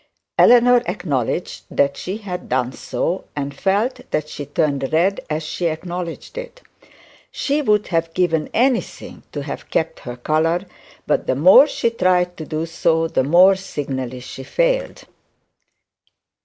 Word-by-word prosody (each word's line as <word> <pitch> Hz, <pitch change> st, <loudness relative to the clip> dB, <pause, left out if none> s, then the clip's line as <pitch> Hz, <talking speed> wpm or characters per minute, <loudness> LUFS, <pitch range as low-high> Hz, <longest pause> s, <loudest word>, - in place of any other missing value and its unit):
Eleanor 245 Hz, 0 st, +6 dB
acknowledged 175 Hz, -, -2 dB
that 140 Hz, 0 st, +1 dB
she 190 Hz, +3 st, -5 dB
had 185 Hz, -5 st, -7 dB
done 125 Hz, 0 st, 0 dB
so, 165 Hz, +11 st, -3 dB
and 140 Hz, -1 st, -3 dB
felt 200 Hz, -, 0 dB
that 150 Hz, -, -1 dB
she 145 Hz, -2 st, -7 dB
turned 145 Hz, -3 st, -1 dB
red 180 Hz, +5 st, +2 dB
as 155 Hz, +1 st, -2 dB
she 170 Hz, +3 st, -2 dB
acknowledged 175 Hz, -, -5 dB
it. -, -, -10 dB, 0.7 s
She 290 Hz, +2 st, -1 dB
would 210 Hz, -6 st, +1 dB
have 165 Hz, -1 st, 0 dB
given 165 Hz, -4 st, +1 dB
anything 250 Hz, 0 st, -1 dB
to 145 Hz, -, -5 dB
have 140 Hz, -, -7 dB
kept 160 Hz, -, -1 dB
her 120 Hz, -1 st, -8 dB
colour, 160 Hz, +7 st, 0 dB, 0.4 s
but -, -, 0 dB
the 130 Hz, -, +1 dB
more 185 Hz, -, +7 dB
she 235 Hz, -5 st, -1 dB
tried 180 Hz, -4 st, +1 dB
to 155 Hz, -, -6 dB
do 155 Hz, +1 st, -2 dB
so, 165 Hz, 0 st, +1 dB
the 145 Hz, -, 0 dB
more 180 Hz, +7 st, +6 dB
she 190 Hz, -, -9 dB, 0.2 s
signally 130 Hz, -2 st, -5 dB
failed. -, -, -2 dB
170 Hz, 145 wpm, -20 LUFS, 150-200 Hz, 0.7 s, more